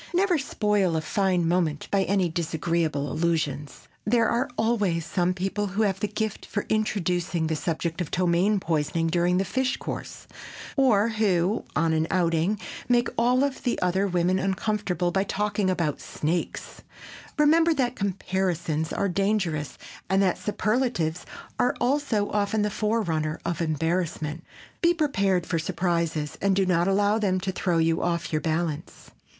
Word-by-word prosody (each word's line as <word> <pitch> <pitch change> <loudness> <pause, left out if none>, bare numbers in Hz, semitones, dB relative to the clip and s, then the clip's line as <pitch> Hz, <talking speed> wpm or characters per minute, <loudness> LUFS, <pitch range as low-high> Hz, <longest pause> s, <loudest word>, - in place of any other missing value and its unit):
Never 360 -3 +3
spoil 210 -9 +1
a 160 - 0
fine 180 0 +1
moment 165 -4 0
by 195 -1 +2
any 190 -2 +2
disagreeable 160 -3 -1
allusions. 155 -4 -2 0.2
There 230 +1 +3
are 240 +5 0
always 205 -8 +1
some 180 0 0
people 195 +3 -2
who 200 +3 0
have 195 -1 -1
a - - +3
gift 215 0 -3
for 205 - -3
introducing 180 -5 0
the 160 0 0
subject 165 +1 -2
of 170 - -3
ptomaine 185 +3 +2
poisoning 165 -1 0
during 175 +1 +2
the 195 - +1
fish 260 +6 0
course, - - -6 0.5
or 230 -6 +4
who, 205 -2 +1
on 160 0 +2
an 160 0 +1
outing, 175 +2 +1 0.3
make 240 -1 +3
all 250 +4 +3
the 250 -2 -3
other 190 +2 +1
women 180 0 +1
uncomfortable 190 -2 -1
by 195 +1 +1
talking 205 -1 -1
about 165 -5 -1
snakes. 165 +3 -3 0.6
Remember 325 +3 +5
that 255 -5 0
comparisons 180 -5 -1
are 200 - 0
dangerous 190 -5 -1 0.3
and 190 0 +3
that 185 - +1
superlatives 210 -7 -1 0.3
are 245 - +2
also 245 -5 +1
often 210 +1 +1
the 210 - 0
forerunner 170 -9 -1
of 170 -1 -2
embarrassment. 160 0 -1 0.4
Be 345 0 +4
prepared 195 - +1
for 165 - -1
surprises 165 -2 -1
and 195 -1 +2
do 195 0 +2
not 175 -1 +2
allow 205 +2 +2
them 190 -3 +1
to 190 0 -2
throw 180 -2 0
you 165 0 +2
off 170 -1 -1
your 155 - +1
balance. 160 -1 -3
185 Hz, 150 wpm, -26 LUFS, 165-210 Hz, 0.6 s, Remember